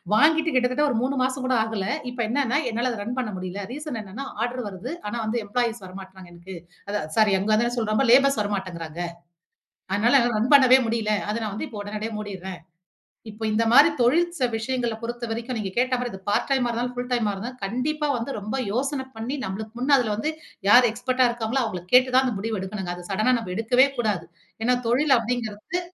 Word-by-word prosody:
வாங்கிட்டு 315 +5 +4
கிட்டத்தட்ட 255 +3 +2
ஒரு 240 - 0
3 265 +2 0
மாசம் 260 0 -1
கூட 255 - +2
ஆகல. 220 -3 -3 0.3
இப்ப 245 - -7
என்னனா 275 +2 +1
என்னால 235 +3 -1
அத 225 - -6
ரன் 240 +4 -4
பண்ண 225 -4 -3
முடியல்ல. 185 +2 -5
ரீசன் 290 -4 -5
என்னனா 215 +8 -7 0.2
ஆர்டர் 245 -1 -4
வருது. 205 - -7 0.2
ஆனா 225 - -4
வந்து 230 +2 -1
எம்ப்ளாயீஸ் 235 -1 -1
வரமாட்டறாங்க 190 -1 -11
எனக்கு. 175 +2 -10 0.3
அதான் 200 -6 -2
சாரி 215 -2 +5
அங்க 205 +3 -1
வந்து 230 +2 +2
என்ன 240 +1 -2
சொல்றேன் 215 +3 +1
லேபர்ஸ் 275 -1 +5
வரமாட்டேங்கிறாங்க. 180 -5 -4 0.9
அதனால 235 +7 +4
என்ன 240 -2 +1
ரன் 235 +6 0
பண்ணவே 260 -2 +8
முடில்ல. 225 -2 0 0.2
அத 210 - -1
நான் 210 -2 -3
வந்து - - -3
இப்ப 220 -4 -8
உடனடியா 210 +2 -5
மூடிறேன். 190 -3 -7 0.7
இப்ப 215 +1 -9
இந்த 220 +2 +2
மாரி 285 +6 +8
தொழில் 295 +1 +2
விஷயங்கள 235 0 -2
பொறுத்தவரைக்கும் 235 +1 -4
நீங்க 200 -3 -3
கேட்ட 255 +1 +2
மாரி 245 -1 -2
இது 190 - -8
பார்ட் 205 - +2
டைமா 265 -3 +2
இருந்தாலும் 240 +1 -2
ஃபுல 245 - -3
டைமா 230 -4 +1
இருந்தாலும் 235 +6 -6
கண்டிப்பா 295 +8 -1
வந்து 235 +4 -4
ரொம்ப 215 +4 -4 0.2
யோசன 265 +4 -1
பண்ணி 230 +5 -4
நம்மளுக்கு 215 +3 -5
முன்னே 265 +4 +1
அதில 240 -5 0
வந்து 260 +9 -1 0.4
யார் 245 +4 +7
எக்ஸ்பெர்ட்டா 250 +3 +1
இருக்காங்களோ 240 +2 -1
அவங்கள 185 -6 -4
கேட்டு 255 +1 +7
தான் 260 - +6
அந்த 250 - 0
முடிவு 220 +1 -2
எடுக்கணும்ங்க. 190 -2 -4
அத 180 - -10
சடன்னா 215 +6 +2
நாம் 220 -6 -6
எடுக்கவே 245 +5 +4
கூடாது. 210 -7 0 0.4
ஏன்னா 250 +1 +3
தொழில 265 +3 +4
அப்டிங்கிறது 230 +5 -3
235 Hz, 195 wpm, -24 LUFS, 210-255 Hz, 0.9 s, பண்ணவே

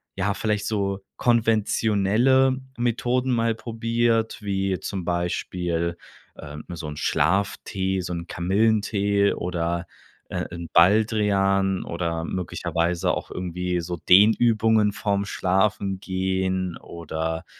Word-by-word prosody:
ja, 100 +1 0
vielleicht 105 -1 -1
so 100 -2 -1 0.2
konventionelle 115 +2 +2 0.2
Methoden 125 +2 0
mal 115 -1 +1
probiert, 115 -1 -1
wie 95 -2 -1
zum 95 -4 -5
Beispiel, 85 -1 -2 0.4
ähm, 75 0 -9
so 85 -3 -6
'n 75 -1 -7
Schlaftee, 95 -1 0
so 90 0 -5
'n 85 0 -5
Kamillentee 100 +1 +1
oder, 85 0 -2 0.4
äh, - - -2
'n 85 -1 -6
Baldrian 100 0 +3
oder 85 -1 -3
möglicherweise 90 0 -1
auch - - -5
irgendwie 90 0 -3
so 85 +1 -4
Dehnübungen 110 +2 +4
vorm 100 0 -1
Schlafengehen 95 -2 -1
oder, 80 0 -5
95 Hz, 100 wpm, -24 LUFS, 90-110 Hz, 0.4 s, Dehnübungen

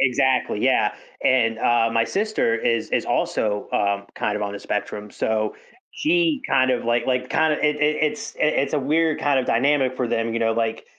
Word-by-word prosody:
Exactly, 130 0 +1
yeah, - - +2 0.3
and, 115 -3 +2
uh, 115 0 +2
my 115 0 +2
sister 205 - 0
is 115 0 -1
is - - 0
also 105 -1 -1
um 100 -1 0
kind 105 0 -2
of 105 - -3
on 100 -1 -3
the 100 - -6
spectrum, 105 +1 -4
so 110 0 -1 0.4
she 325 -3 +1
kind 130 0 +3
of, 125 - -1
like 120 0 0
like, 125 -1 -1
kind 160 -1 +2
of - - -4
it 150 0 +1
it 150 +1 +1
it's 225 +9 -2
i - - +3
it's 140 -2 +1
a - - +2
weird 155 +3 +1
kind 145 -2 +2
of 130 - -1
dynamic 130 +1 +1
for 125 -2 -1
them, 115 -1 -1
you 115 - -1
know, 115 0 +2
like, 115 0 -2
125 Hz, 205 wpm, -22 LUFS, 115-150 Hz, 0.4 s, kind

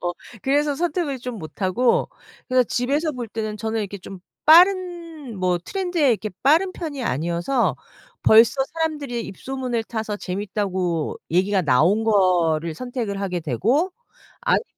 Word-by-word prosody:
어 175 0 -2 0.3
그래서 290 +1 +2
선택을 330 -5 -1
좀 245 -2 -6
못 155 +2 -10
하고 210 +7 +2 0.4
그래서 255 -1 +4
집에서 285 +7 0
볼 245 -3 -5
때는 215 -1 -4
저는 220 +1 -2
이렇게 200 -1 -5
좀 190 0 -10 0.2
빠른 340 - +4
뭐 180 -1 +1
트렌드에 350 - 0
이렇게 215 -2 -1
빠른 325 +7 +4
편이 305 -7 -5
아니어서 170 - 0 0.5
벌써 230 +5 +6
사람들이 295 -7 -2
입소문을 250 +3 -3
타서 220 -2 -4
재밌다고 190 -4 -2
얘기가 190 +2 +2
나온 170 - +3
거를 170 -6 +2
선택을 230 -2 -4
하게 180 -3 -2
되고 230 - +1 0.5
아니면은 - - +2
225 Hz, 315 characters per minute, -22 LUFS, 185-285 Hz, 0.5 s, 벌써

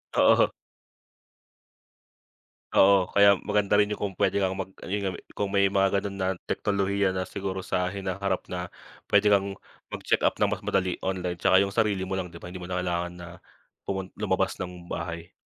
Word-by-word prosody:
Oo. - - +5 2.3
Oo, 95 -1 +6
kaya 100 -1 +6
maganda 105 0 +2
rin 105 - +4
yung 105 - -5
kung - - -18
pwede 100 0 +2
kang 95 +1 -1
mag 95 - -2 0.2
ayun 100 0 -2
nga - - -1
me - - -9
kung 100 - -2
may 100 0 +2
mga 95 0 +3
ganon 100 0 -5
na 95 - 0 0.2
teknolohiya 100 -1 0
na 95 - -1
siguro 95 0 -4
sa 90 0 0
hinaharap 95 0 -2
na 90 0 -3 0.4
pwede 105 0 +4
kang 100 -1 +2 0.3
magcheck-up - - 0
ng - - +1
mas - - -2
madali 95 -1 -1
online 90 -2 -3
tsaka 95 +2 +5
yung 100 - -3
sarili 105 -3 +1
mo 95 0 -2
lang, 90 - -3
'di 85 -1 -13
ba. 90 - -7
Hindi 90 - -7
mo 90 - -7
na 90 - -3
kailangan 85 0 -2
na 85 -1 -9 0.6
pumun 95 -1 -3
lumabas 95 -2 0
ng 90 -1 -7
bahay. 85 0 -5
95 Hz, 180 wpm, -27 LUFS, 90-100 Hz, 2.3 s, Oo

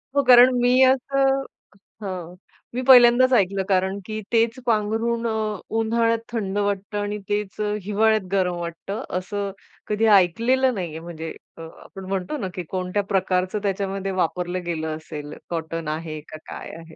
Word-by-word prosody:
हो 280 - +3
कारण 250 0 +8
मी 250 +2 +4
असं 270 +1 +3 0.6
हां, 180 -3 -6 0.4
मी 255 - -1
पहिल्यांदाच 250 0 +7
ऐकलं, 195 -3 +2
कारण 190 +1 +1
की 215 0 -5
तेच 230 +2 +2
पांघरून 230 +1 0
अ, 215 -2 -2 0.2
उन्हाळ्यात 230 0 +1
थंड 205 -4 -2
वाटतं 200 0 -1
आणि 205 0 -2
तेच 205 -1 -2
अ, 210 0 0
हिवाळ्यात 215 +2 +2
गरम 185 -2 +1
वाटतं. 170 +5 -5
असं 200 +1 -3 0.4
कधी 215 +1 +1
ऐकलेलं 240 +8 +2
नाही 180 -5 -3
आहे 160 +1 -7
म्हणजे 165 -1 -7 0.3
अ, - - -9 0.2
आपण 195 -1 -11
म्हणतो 195 +9 -2
ना 195 - -3
की 180 - -4
कोणत्या 185 +2 -1
प्रकारचं 185 +1 +1
त्याच्यामध्ये 195 0 -2
वापरलं 180 0 -2
गेलं 160 -2 -3
असेल, 150 -2 -8 0.2
कॉटन 165 -1 -4
आहे 155 0 -4
का, 155 - -9
काय - - -8
आहे 165 -1 -13
200 Hz, 155 wpm, -23 LUFS, 180-230 Hz, 0.6 s, कारण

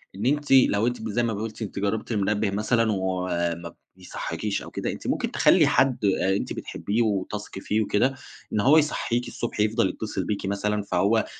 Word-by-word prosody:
إن 100 +4 -4
أنتِ 145 +2 0
لو 120 -4 +5
أنتِ 125 -1 -2
ب 110 - -4
زي 120 +4 0
ما 115 -2 0
ب - - -4
قلتِ 110 +1 -6
أنتِ 100 -2 -4
جربتِ 105 +4 -2
المنبِّه 105 0 0
مثلًا 110 +2 +1
وما 90 -3 -2 0.2
بيصحيكيش 105 -2 -4
أو - - -10
كده، - - -3
أنتِ - - -7
ممكن - - -1
تخلّي - - +5
حد 125 -5 +2
آآ، 95 0 +2
أنتِ - - -3
بتحبيه 110 +4 -2
وتثقي 105 -2 -2
فيه 110 +1 0
وكده، 125 +6 +1 0.4
إن 105 - +1
هو 140 +8 +5
يصحيكي 125 -5 0
الصبح، 120 -2 -5
يفضل 110 -1 +2
يتصل 105 -3 -4
بيكِ 100 0 -2
مثلًا، 105 +1 -1
فهو 100 +4 +2
105 Hz, 190 wpm, -25 LUFS, 100-115 Hz, 0.4 s, لو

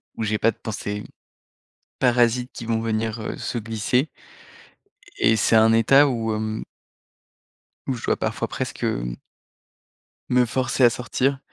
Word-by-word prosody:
où - - -3
j'ai 110 0 0
pas 115 - +3
de - - -19
pensées 105 -1 -5 1.0
parasites 125 0 +2
qui - - -8
vont 115 -1 0
venir, 110 0 -2
heu, 110 - -5
se 120 - -3
glisser 115 +6 -1 1.1
et 110 - +4
c'est 110 +1 +2
un 110 0 +6
état 135 +6 +6
où, 115 -3 -1
hem 110 0 -3 1.2
où 135 - 0
je 115 - -6
dois - - +1
parfois - - -2
presque, - - -5
hem - - -1 1.1
me 125 0 +4
forcer 125 +1 0
à 120 - +8
sortir 130 +3 -1
115 Hz, 145 wpm, -23 LUFS, 110-125 Hz, 1.2 s, à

